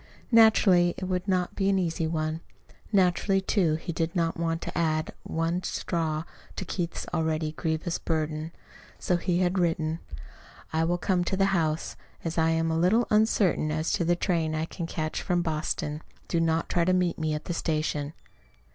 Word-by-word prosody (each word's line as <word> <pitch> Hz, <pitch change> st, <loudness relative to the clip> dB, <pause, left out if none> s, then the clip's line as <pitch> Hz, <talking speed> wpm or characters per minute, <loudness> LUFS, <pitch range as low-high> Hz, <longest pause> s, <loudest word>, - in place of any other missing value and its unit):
Naturally 200 Hz, -6 st, +5 dB
it -, -, -6 dB
would 185 Hz, +1 st, -2 dB
not 180 Hz, -2 st, +1 dB
be 195 Hz, -1 st, +1 dB
an 195 Hz, -, +3 dB
easy 165 Hz, -3 st, 0 dB
one. 160 Hz, 0 st, -2 dB, 0.5 s
Naturally 195 Hz, 0 st, +3 dB
too, 190 Hz, -5 st, +1 dB
he 165 Hz, +2 st, -4 dB
did 165 Hz, +1 st, -2 dB
not 165 Hz, -2 st, +1 dB
want 165 Hz, -1 st, -1 dB
to -, -, -6 dB
add 155 Hz, -2 st, 0 dB
one 165 Hz, +2 st, -1 dB
straw 160 Hz, -4 st, -2 dB, 0.3 s
to 190 Hz, -, -4 dB
Keith's 175 Hz, -1 st, -3 dB
already 160 Hz, -2 st, 0 dB
grievous 160 Hz, +1 st, -2 dB
burden. 155 Hz, 0 st, -2 dB, 0.5 s
So 180 Hz, -, +1 dB
he 175 Hz, 0 st, 0 dB
had 185 Hz, +1 st, +1 dB
written: 165 Hz, -2 st, 0 dB, 0.7 s
I 160 Hz, +1 st, +2 dB
will 175 Hz, +1 st, +1 dB
come 180 Hz, 0 st, +1 dB
to 190 Hz, -, -1 dB
the 195 Hz, 0 st, +2 dB
house. 160 Hz, -3 st, 0 dB, 0.3 s
As 165 Hz, 0 st, -2 dB
I 160 Hz, 0 st, +3 dB
am 165 Hz, 0 st, +1 dB
a 160 Hz, -, +1 dB
little 215 Hz, +8 st, +3 dB
uncertain 210 Hz, -7 st, +3 dB
as 155 Hz, +1 st, -1 dB
to -, -, +1 dB
the 175 Hz, +1 st, +2 dB
train 165 Hz, -3 st, 0 dB
I 155 Hz, +1 st, -1 dB
can 165 Hz, 0 st, -6 dB
catch 155 Hz, -2 st, -3 dB
from 175 Hz, -1 st, 0 dB
Boston, 155 Hz, -1 st, -2 dB, 0.3 s
do 170 Hz, -, 0 dB
not 165 Hz, 0 st, +1 dB
try 175 Hz, -, +1 dB
to 185 Hz, +2 st, +2 dB
meet 180 Hz, -2 st, +1 dB
me 155 Hz, -1 st, 0 dB
at 150 Hz, -, -6 dB
the 175 Hz, -, -2 dB
station. 155 Hz, -2 st, -1 dB
165 Hz, 180 wpm, -27 LUFS, 160-180 Hz, 0.7 s, Naturally